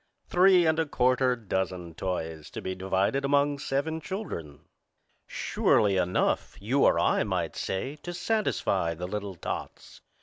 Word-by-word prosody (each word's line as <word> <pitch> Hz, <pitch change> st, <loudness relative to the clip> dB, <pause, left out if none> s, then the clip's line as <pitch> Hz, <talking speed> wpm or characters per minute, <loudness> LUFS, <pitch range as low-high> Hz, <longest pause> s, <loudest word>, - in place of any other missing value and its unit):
Three 180 Hz, -1 st, +5 dB
and 160 Hz, 0 st, +2 dB
a 160 Hz, -, +1 dB
quarter 130 Hz, -1 st, +2 dB
dozen 95 Hz, -6 st, -3 dB
toys 80 Hz, -3 st, -4 dB
to -, -, -7 dB
be 95 Hz, -, -2 dB
divided 95 Hz, +8 st, 0 dB
among 145 Hz, +1 st, +2 dB
seven 145 Hz, +4 st, -2 dB
children. 85 Hz, -, -6 dB, 0.7 s
Surely 100 Hz, -2 st, +2 dB
enough, 90 Hz, -1 st, 0 dB
you 125 Hz, +8 st, +2 dB
or -, -, +4 dB
I -, -, +3 dB
might -, -, -2 dB
say, 130 Hz, +10 st, -3 dB
to 175 Hz, -, -7 dB
satisfy 175 Hz, -, 0 dB
the 90 Hz, +2 st, -5 dB
little 100 Hz, -1 st, -4 dB
tots. -, -, -7 dB
115 Hz, 140 wpm, -28 LUFS, 95-145 Hz, 0.7 s, Three